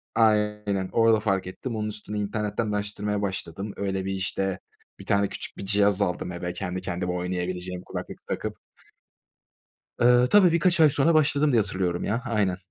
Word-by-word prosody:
Aynen 105 -3 +2
orada 115 -1 +4
fark 95 -3 0
ettim. 115 +6 -5
Onun 105 -1 -2
üstüne 105 0 -6
internetten 105 +1 -2
araştırmaya 105 0 -2
başladım. 95 +1 -4
Öyle 95 -1 -2
bir 95 - -2
işte 95 0 -2 0.4
bir - - -10
tane 100 0 +2
küçük - - -6
bir 100 - -6
cihaz 100 0 +3
aldım 90 -1 -1
eve 90 0 -4
kendi 90 0 -4
kendime 90 0 -3
oynayabileceğim 90 0 -3
kulaklık - - -7
takıp. - - -3 1.4
Iıı, 125 +1 +6
tabii 190 -1 +6
birkaç 170 0 +2
ay 155 -2 +7
sonra 145 +3 +3
başladım 150 -1 +3
diye 115 -3 +4
hatırlıyorum 90 -3 -2
ya. 115 +4 -1
Aynen. 105 -6 0
100 Hz, 160 wpm, -26 LUFS, 95-110 Hz, 1.4 s, ay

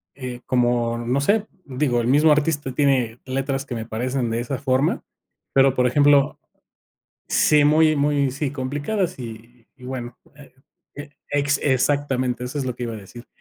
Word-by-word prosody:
Eh, 125 -2 -7
como 120 -2 +1
no 120 +3 -1
sé, 205 +8 +1 0.2
digo, 130 -2 0
el 115 - -2
mismo 150 +5 +5
artista 150 -2 0
tiene 125 -4 +1
letras 135 +1 -2
que 130 - -6
me 110 -1 -5
parecen 120 +2 -2
de 115 +1 -1
esa 125 +2 -4
forma, 135 +1 0 0.5
pero 135 -1 +4
por 125 -1 +2
ejemplo. 145 +2 +3 0.9
Sí, 150 -1 +4
muy 155 +1 +4
muy 140 -1 +1
sí, 140 +1 -3
complicadas 145 +8 -2
y 115 0 -10
y 125 - -21
bueno, 125 -2 -6 0.2
e 145 -3 -16 0.4
e 145 0 -9 0.2
ex 145 0 +1
exactamente 130 -2 0
eso 125 +4 -6
es 140 - -2
lo 125 -2 -4
que 125 - -4
iba 115 -1 -4
a - - -6
decir. 110 +4 -12
130 Hz, 170 wpm, -22 LUFS, 125-145 Hz, 0.9 s, mismo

